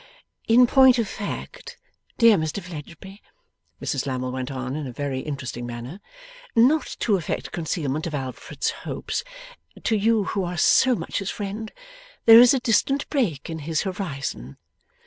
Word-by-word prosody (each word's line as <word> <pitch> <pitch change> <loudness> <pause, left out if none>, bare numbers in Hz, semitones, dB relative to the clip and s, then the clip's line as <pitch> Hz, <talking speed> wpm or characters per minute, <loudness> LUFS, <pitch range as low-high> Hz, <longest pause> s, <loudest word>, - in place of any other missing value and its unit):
') - - -41
'In 240 +2 +6
point 260 0 +6
of 230 -3 0
fact, 205 +1 -7 0.4
dear 230 -3 +6
Mr 160 +1 -2
Fledgeby,' 180 +3 -10 0.6
Mrs 135 -2 -2
Lammle 130 -1 -2
went 130 0 -4
on 130 -1 -4
in 150 -2 -4
a - - -6
very 135 +1 -3
interesting 130 -4 -5
manner, 120 +9 -7 0.6
'not 260 +7 +3
to 210 -4 +2
affect 170 - -4
concealment 155 -2 -2
of 155 - -4
Alfred's 130 -2 -4
hopes, - - -4 0.6
to 225 - +1
you 220 +1 +2
who 195 0 -2
are 175 0 -4
so 255 +9 +4
much - - -3
his 195 -1 -4
friend, 210 +2 -5 0.5
there 225 0 +10
is 245 - +7
a 270 - +2
distant 255 +4 +1
break 200 - -1
in 160 -1 -5
his 155 +1 -2
horizon. 140 - -5
175 Hz, 160 wpm, -24 LUFS, 140-225 Hz, 0.6 s, there